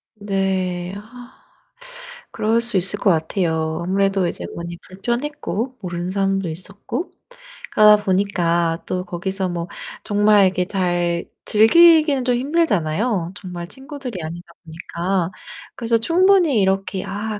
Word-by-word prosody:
네. 190 Hz, -3 st, -2 dB
아. 245 Hz, +4 st, -12 dB, 1.0 s
그럴 225 Hz, +2 st, +1 dB
수 235 Hz, -4 st, 0 dB
있을 195 Hz, +3 st, +1 dB
것 -, -, +2 dB
같아요. 160 Hz, -1 st, 0 dB
아무래도 195 Hz, 0 st, +1 dB
이제 -, -, -5 dB
많이 170 Hz, 0 st, -6 dB
불편했고 245 Hz, +4 st, -3 dB
모르는 175 Hz, -1 st, -4 dB
사람도 195 Hz, -2 st, 0 dB
있었고 200 Hz, -, -5 dB, 0.6 s
그러다 210 Hz, -1 st, +6 dB
보니까 175 Hz, -4 st, 0 dB
또 185 Hz, 0 st, -3 dB
거기서 190 Hz, +1 st, -3 dB
뭐 170 Hz, 0 st, -4 dB, 0.4 s
정말 205 Hz, -1 st, +4 dB
이렇게 185 Hz, -1 st, +1 dB
잘 175 Hz, -3 st, -1 dB, 0.2 s
즐기기는 300 Hz, +4 st, +5 dB
좀 250 Hz, -1 st, +2 dB
힘들잖아요, 215 Hz, -, 0 dB
정말 180 Hz, -3 st, -7 dB
친구들이 265 Hz, -, -7 dB
아니다 170 Hz, +3 st, -7 dB, 0.2 s
보니까. 170 Hz, +2 st, -3 dB, 0.4 s
그래서 230 Hz, -1 st, +1 dB
충분히 340 Hz, -, +3 dB
이렇게 190 Hz, 0 st, 0 dB
'아 210 Hz, +2 st, -4 dB
195 Hz, 280 characters per minute, -20 LUFS, 175-230 Hz, 1.0 s, 그러다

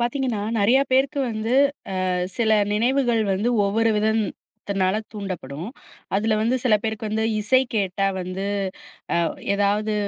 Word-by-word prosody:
பார்த்தீங்கன்னா, 240 Hz, -2 st, -1 dB, 0.2 s
நெறையா 240 Hz, +7 st, +4 dB
பேருக்கு 270 Hz, +2 st, +2 dB
வந்து 220 Hz, +2 st, -2 dB, 0.5 s
அ -, -, 0 dB, 0.3 s
சில 225 Hz, -2 st, +2 dB, 0.2 s
நினைவுகள் 240 Hz, +1 st, +2 dB
வந்து 205 Hz, +5 st, 0 dB, 0.2 s
ஒவ்வொரு 225 Hz, +3 st, +2 dB
விதத்தினால 205 Hz, -2 st, -1 dB, 0.2 s
தூண்டப்படும். 180 Hz, -5 st, -5 dB, 0.5 s
அதில 215 Hz, +1 st, +1 dB
வந்து 235 Hz, +3 st, +2 dB
சில 235 Hz, -4 st, +4 dB
பேருக்கு 220 Hz, 0 st, -3 dB
வந்து 220 Hz, +1 st, 0 dB
இசை 255 Hz, +5 st, +3 dB
கேட்டா 195 Hz, -1 st, 0 dB
வந்து 185 Hz, +2 st, -4 dB, 0.7 s
அ -, -, +3 dB, 0.4 s
ஏதாவது 205 Hz, +2 st, +1 dB
215 Hz, 125 wpm, -23 LUFS, 200-235 Hz, 0.7 s, நெறையா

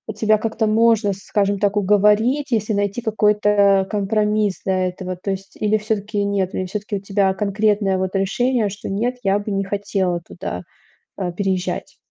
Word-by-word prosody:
тебя 215 Hz, 0 st, +2 dB
как-то 220 Hz, 0 st, -1 dB
можно, 220 Hz, -2 st, +3 dB
скажем 200 Hz, 0 st, -1 dB
так, 205 Hz, 0 st, +1 dB
уговорить, 210 Hz, +8 st, +3 dB
если 215 Hz, -1 st, 0 dB
найти 205 Hz, +3 st, -1 dB
какой-то 210 Hz, -3 st, +3 dB
компромисс 210 Hz, 0 st, 0 dB
для 185 Hz, -1 st, +1 dB
этого? 180 Hz, 0 st, -6 dB
То 195 Hz, +2 st, -3 dB
есть 195 Hz, +1 st, -6 dB
или 215 Hz, 0 st, +1 dB
всё-таки 210 Hz, -1 st, -2 dB
нет, 195 Hz, -2 st, -1 dB
или 185 Hz, -, -1 dB
всё-таки 205 Hz, +2 st, -4 dB
у -, -, -7 dB
тебя 195 Hz, -1 st, +1 dB
конкретное 205 Hz, -1 st, +1 dB
вот 190 Hz, +1 st, -2 dB
решение, 220 Hz, +3 st, +1 dB
что: 200 Hz, +1 st, -7 dB
"Нет, 240 Hz, +6 st, -1 dB
я 195 Hz, +1 st, +2 dB
бы 205 Hz, 0 st, -5 dB
не 195 Hz, 0 st, 0 dB
хотела 195 Hz, -3 st, -1 dB
туда, 90 Hz, -, -6 dB, 0.5 s
а, 180 Hz, -2 st, -2 dB
переезжать"? 185 Hz, 0 st, -2 dB
205 Hz, 165 wpm, -20 LUFS, 195-215 Hz, 0.5 s, можно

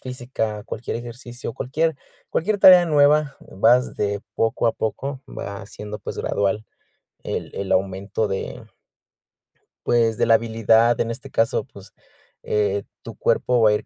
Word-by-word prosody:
física, 120 Hz, -4 st, -4 dB
cualquier 115 Hz, +1 st, -5 dB
ejercicio, 120 Hz, 0 st, -7 dB
cualquier 160 Hz, +4 st, -1 dB, 0.3 s
cualquier 205 Hz, +5 st, 0 dB
tarea 180 Hz, -2 st, +8 dB
nueva 150 Hz, -1 st, +3 dB
vas 120 Hz, +6 st, +2 dB
de 100 Hz, -1 st, -1 dB
poco 115 Hz, +1 st, 0 dB
a 115 Hz, -, +3 dB
poco, 135 Hz, +5 st, -4 dB
va 100 Hz, -1 st, -7 dB
siendo, 105 Hz, 0 st, -8 dB
pues, 100 Hz, -, -7 dB
gradual 100 Hz, +2 st, -1 dB, 0.6 s
el -, -, -4 dB
el 100 Hz, -1 st, -4 dB
aumento 95 Hz, +3 st, -1 dB
de 95 Hz, -, -4 dB, 1.2 s
pues, 115 Hz, -2 st, +2 dB
de -, -, +2 dB
la 115 Hz, -, +7 dB
habilidad 115 Hz, +1 st, +3 dB
en 115 Hz, -, 0 dB
este 135 Hz, +4 st, -8 dB
caso, 115 Hz, -, +1 dB
pues, -, -, -15 dB, 0.5 s
eh, 100 Hz, -1 st, 0 dB, 0.2 s
tu -, -, -9 dB
cuerpo 125 Hz, -2 st, +1 dB
va 110 Hz, -, +6 dB
a -, -, +3 dB
ir 105 Hz, -, -2 dB
115 Hz, 145 wpm, -22 LUFS, 105-130 Hz, 1.2 s, tarea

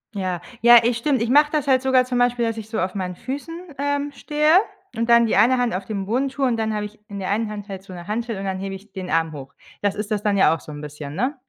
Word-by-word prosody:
Ja, 185 Hz, -3 st, -2 dB, 0.2 s
ja, 240 Hz, +1 st, +8 dB
ey, 235 Hz, +1 st, +3 dB
stimmt. 245 Hz, +2 st, 0 dB
Ich 230 Hz, -, -2 dB
mache 295 Hz, +3 st, +5 dB
das 300 Hz, -2 st, -1 dB
halt 260 Hz, -2 st, +4 dB
sogar 260 Hz, -1 st, +3 dB
zum 250 Hz, -1 st, -1 dB
Beispiel, 245 Hz, -1 st, +2 dB
dass 225 Hz, 0 st, -2 dB
ich 220 Hz, -1 st, -7 dB
so 220 Hz, -, -2 dB
auf 185 Hz, 0 st, -1 dB
meinen 180 Hz, -2 st, -3 dB
Füßen, 280 Hz, -, -6 dB, 0.2 s
ähm, 285 Hz, 0 st, -1 dB
stehe 300 Hz, +3 st, +3 dB, 0.4 s
und 230 Hz, +1 st, -1 dB
dann 235 Hz, 0 st, +6 dB
die 225 Hz, -, +1 dB
eine 235 Hz, +6 st, +5 dB
Hand 245 Hz, -1 st, 0 dB
auf 190 Hz, +1 st, -3 dB
den 200 Hz, -2 st, -4 dB
Boden 255 Hz, +7 st, 0 dB
tue 275 Hz, 0 st, -1 dB
und 245 Hz, -2 st, +2 dB
dann 220 Hz, -1 st, -1 dB
habe 210 Hz, 0 st, -2 dB
ich 210 Hz, +1 st, -11 dB
in 200 Hz, -, -7 dB
der 190 Hz, -, -3 dB
einen 215 Hz, +1 st, 0 dB
Hand 205 Hz, -1 st, -7 dB
halt 195 Hz, -2 st, -7 dB
so 190 Hz, -1 st, -12 dB
'ne 175 Hz, -1 st, -9 dB
Hantel 225 Hz, +1 st, -3 dB
und 195 Hz, -, -5 dB
dann 190 Hz, -1 st, -2 dB
hebe 195 Hz, 0 st, -4 dB
ich 195 Hz, +2 st, -14 dB
den 185 Hz, -2 st, -6 dB
Arm 165 Hz, -1 st, +1 dB
hoch. 140 Hz, -2 st, -9 dB, 0.3 s
Das 205 Hz, -1 st, 0 dB
ist 210 Hz, +1 st, -5 dB
das 210 Hz, -2 st, 0 dB
dann 205 Hz, -2 st, +1 dB
ja 190 Hz, -, +5 dB
auch -, -, -9 dB
so 150 Hz, -, -11 dB
'n 145 Hz, 0 st, -8 dB
bisschen, 150 Hz, -1 st, -8 dB
ne? 255 Hz, -, -1 dB
220 Hz, 300 wpm, -22 LUFS, 195-250 Hz, 0.4 s, ja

